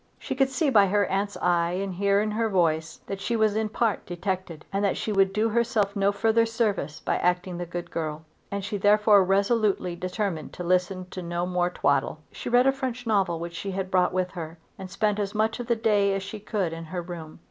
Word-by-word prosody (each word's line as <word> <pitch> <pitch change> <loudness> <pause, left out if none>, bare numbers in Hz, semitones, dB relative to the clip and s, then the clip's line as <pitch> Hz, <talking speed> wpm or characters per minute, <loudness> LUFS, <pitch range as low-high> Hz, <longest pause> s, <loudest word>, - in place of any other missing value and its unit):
She - - -4
could 270 0 +2
see 285 +1 +1
by 205 -5 +6
her 205 +1 +2
aunt's 200 +1 -2
eye 175 -1 +2
and 190 +1 -2
hear 200 +2 +2
in 215 0 -1
her 225 +1 0
voice 160 -4 0
that 195 0 -5
she 235 - -1
was 215 -2 +2
in 220 0 0
part 220 -2 0
detected; 180 -2 -4
and 200 +1 0
that 200 - +1
she 220 - -2
would 195 -1 +3
do 215 +3 +1
herself 220 -3 +1
no 200 0 +3
further 225 +2 +2
service 215 -10 -1
by - - -1
acting 180 0 0
the 175 - -4
good 175 +1 -6
girl; 155 -1 -4 0.2
and 200 -1 -3
she 205 - -3
therefore 205 0 +5
resolutely 200 -1 +1
determined 180 -2 -3
to 180 - -6
listen 180 +1 0
to 185 - -5
no 175 0 -2
more 180 -1 0
twaddle. 140 -4 +1
She - - -6
read 245 +1 +5
a 270 - +5
French 255 -3 -4
novel 195 -6 +1
which 170 0 -6
she 195 +3 -5
had 190 0 -3
brought 180 -1 +3
with 185 0 -1
her, 165 -2 -7 0.2
and 190 - -8
spent 210 +2 0
as 205 0 -2
much 220 +2 +1
of 245 - -5
the 235 - +2
day 205 -3 +2
as 195 - -3
she 210 +2 -7
could 200 -5 -2
in 165 0 -7
her 175 +2 -5
bedroom. 170 -3 -8
195 Hz, 230 wpm, -26 LUFS, 180-215 Hz, 0.2 s, by